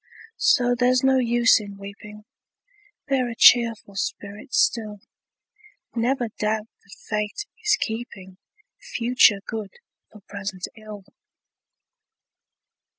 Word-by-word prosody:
So 245 -2 +3
there's 250 +1 +2
no 265 0 +4
use 240 -1 +4
in 200 -2 -9
weeping, 210 +1 -11 0.8
Bear 260 -3 0
a 230 - -6
cheerful 230 -4 +5
spirit 205 +3 -5
still; 225 - 0 0.9
Never 240 0 -1
doubt 215 0 -1 0.2
that 200 - -16
Fate 210 - -3 0.2
is 425 0 +3
keeping 195 -5 -6 0.4
Future 235 -4 +2
good 215 -3 -6 0.4
for 215 - -15
present 195 -2 -6
ill! 215 -2 -11
220 Hz, 100 wpm, -23 LUFS, 205-245 Hz, 0.9 s, cheerful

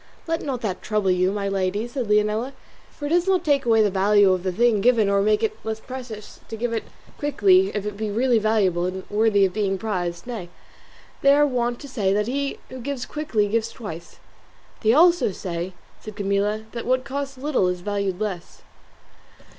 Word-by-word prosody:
"Let 330 0 -1
not 260 -4 -3
that 195 -5 -3
trouble 210 -3 0
you, 185 +1 +2
my 200 -1 -2
lady," 195 +3 -1
said 245 -2 -4
Leonela, 210 +5 +1 0.4
"for 290 - -8
it - - -2
does 350 +3 +2
not 370 -2 +2
take 280 -4 +2
away 225 -1 +5
the 205 - +1
value 200 +1 +4
of 185 - -1
the 185 0 -1
thing 220 +1 +2
given 230 -2 +4
or 200 0 +3
make 210 +1 +2
it 435 0 -2
the - - -12
less 220 0 -3
precious 240 -4 -9
to 225 - -5
give 230 +1 -2
it 225 - -2 0.3
quickly 370 +6 +4
if 205 -1 -2
it 210 -1 -4
be 215 0 -2
really 235 +2 +2
valuable 200 -5 +1
and 185 +1 -5
worthy 210 -1 +3
of 185 - -2
being 195 -2 0
prized; 175 -4 -3
nay, 225 -8 -6 0.7
they 275 0 +6
are 295 0 +5
wont 240 -3 -1
to 285 - -8
say 205 -8 0
that 210 +1 +1
he 275 +4 -2
who 260 - -8
gives 260 0 -4
quickly 270 -9 -1
gives 225 +2 0
twice." 175 -8 -9 0.6
"They 215 - +1
say - - +6
also," 340 - +5
said 175 -1 -4 0.5
Camilla, 205 +1 0
"that 235 -1 -6
what 255 0 +2
costs 275 0 -4
little 265 -8 +1
is 180 0 -2
valued 200 -1 -2
less." 200 -5 -5
215 Hz, 200 wpm, -23 LUFS, 200-255 Hz, 0.7 s, they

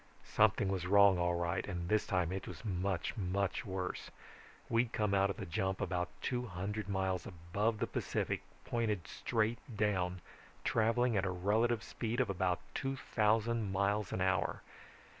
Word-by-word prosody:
Something 105 -2 +4
was 95 -2 -1
wrong 100 -1 +6
all 85 0 +2
right, 85 0 0
and 90 -3 -3
this 105 +1 +2
time 90 -2 +1
it 95 0 -4
was - - -8
much, 95 -2 -1
much 100 +4 -1
worse. 95 -1 -3 0.6
We'd 115 0 +2
come 105 -2 +1
out 100 0 +4
of 100 - -3
the - - -5
jump 95 +3 -1
about 90 -1 -1
two 125 0 -1
hundred 100 +2 -4
miles 95 -2 -1
above 100 +6 -1
the - - 0
Pacific, - - -2 0.2
pointed 110 -8 -1
straight 115 0 0 0.2
down, 95 -4 +1 0.4
traveling 115 +1 +2
at 95 - +2
a 95 - 0
relative 105 +5 +1
speed 115 +1 -3
of 125 -6 +2
about 90 -1 0
two 135 0 -2
thousand 110 -2 +1
miles 100 +1 +1
an 95 - -2
hour. 95 0 +1
100 Hz, 160 wpm, -35 LUFS, 90-110 Hz, 0.6 s, wrong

